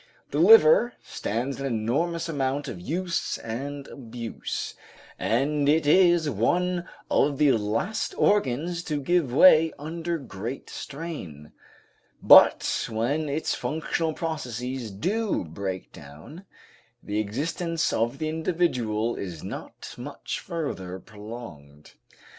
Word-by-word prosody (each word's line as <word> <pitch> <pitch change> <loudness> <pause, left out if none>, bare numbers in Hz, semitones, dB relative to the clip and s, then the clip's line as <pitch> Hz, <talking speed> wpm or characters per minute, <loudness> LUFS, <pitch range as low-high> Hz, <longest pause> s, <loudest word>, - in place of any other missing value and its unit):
The - - -1
liver 450 - +7
stands 125 +6 -3
an 135 - -2
enormous 145 +9 -1
amount 140 -2 -1
of 90 -7 -6
use 170 - -2
and 140 +5 -6
abuse, 115 -3 -6 0.5
and 140 +5 +1
it 155 +1 +3
is 175 0 +5
one 175 - 0 0.2
of 140 -1 +2
the 145 -1 +5
last 115 - -1
organs 170 -1 +1
to 150 -2 -1
give 155 -1 +1
way 160 +3 +7
under 165 +3 -3
great 120 -2 -7
strain, 135 - -7 0.7
but - - +6
when 140 +8 -1
its 150 +3 -1
functional 160 +4 -2
processes 125 -6 -4
do 195 - -1
break 95 +3 -5
down, 80 - -12 0.6
the 105 +1 -2
existence 165 - -1
of 115 +4 0
the 155 +1 -2
individual 155 -10 0
is 85 -5 -6
not - - -8
much - - -5
further 95 - -4
prolonged. 100 -10 -11
140 Hz, 115 wpm, -26 LUFS, 110-165 Hz, 0.7 s, liver